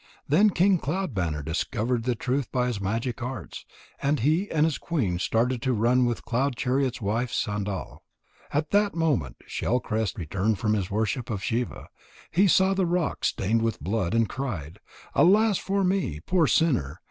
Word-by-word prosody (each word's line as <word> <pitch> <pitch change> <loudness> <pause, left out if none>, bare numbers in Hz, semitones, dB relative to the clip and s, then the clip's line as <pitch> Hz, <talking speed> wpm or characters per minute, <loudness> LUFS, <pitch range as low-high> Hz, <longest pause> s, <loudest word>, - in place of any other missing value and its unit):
Then 195 +9 +5
King 190 0 +3
Cloud 180 +1 -2
banner 80 -7 -2
discovered 115 - -1
the 125 -1 +1
truth 130 +3 -2
by 125 -2 +1
his 120 -5 -2
magic 115 +5 -2
arts, 125 +2 -6 0.3
and 140 -1 +1
he 160 - +2
and 155 -1 +2
his 155 -5 -1
queen 110 - -1
started 115 +5 0
to 130 0 +1
run 120 +3 +3
with 120 - -3
Cloud 130 +3 0
chariot's 130 +1 0
wife 115 +4 -1
Sandal. 105 -2 -3 0.5
At 150 +1 -1
that 205 -1 +2
moment 145 - 0
Shell 125 - -1
crest 110 -2 -2
returned 95 +6 -1
from 105 +2 0
his 100 -3 -1
worship 110 +3 -1
of 100 -4 -3
Shiva. 120 +3 -2 0.4
He 195 +5 +4
saw 190 +1 +4
the 190 -2 +1
rock 175 -2 -1
stained 110 +4 +1
with 115 0 -1
blood, 95 +3 -1
and 115 -1 +3
cried: 100 - -5 0.3
"Alas 205 +3 +4
for 195 +1 0
me, 180 - 0
poor 165 - +2
sinner! 125 - +1
125 Hz, 170 wpm, -26 LUFS, 105-160 Hz, 0.5 s, Then